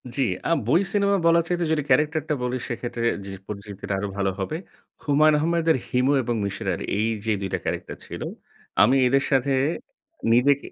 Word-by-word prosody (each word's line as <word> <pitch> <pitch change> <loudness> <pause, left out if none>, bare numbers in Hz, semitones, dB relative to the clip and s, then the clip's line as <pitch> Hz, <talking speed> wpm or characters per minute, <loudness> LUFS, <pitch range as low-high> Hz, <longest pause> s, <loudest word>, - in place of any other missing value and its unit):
জ্বি, 135 - +2 0.3
আ - - +1 0.2
বই 160 +9 +4
সিনেমা 200 -1 +2
বলার 170 0 +5
চাইতে 175 -1 0
যদি 155 -2 +1
ক্যারাক্টার 150 +1 +3
টা - - +2
বলি, 125 +1 -1
সেক্ষেত্রে 120 -1 -3 0.2
যে, 100 - -7 0.2
পরিচিতিটা 100 -1 -6
আরো 100 - -2
ভালো 100 -1 +1
হবে। 100 +11 -2 0.5
হুমায়ূন 150 +1 +4
আহমেদের 165 +1 +2
হিমু 125 +3 +2
এবং 120 0 -1
মিসির 100 - -4
আলি, - - -4
এই 110 +2 +1 0.2
যে, 110 - +1
২ 95 - -3
টা - - 0
ক্যারাক্টার - - -4
ছিল। - - -8 0.6
আমি 125 +6 +5
এদের 135 +2 +3
সাথে 135 0 +2 0.8
নিজেকে 140 +4 +3
135 Hz, 180 wpm, -24 LUFS, 115-155 Hz, 0.8 s, বলার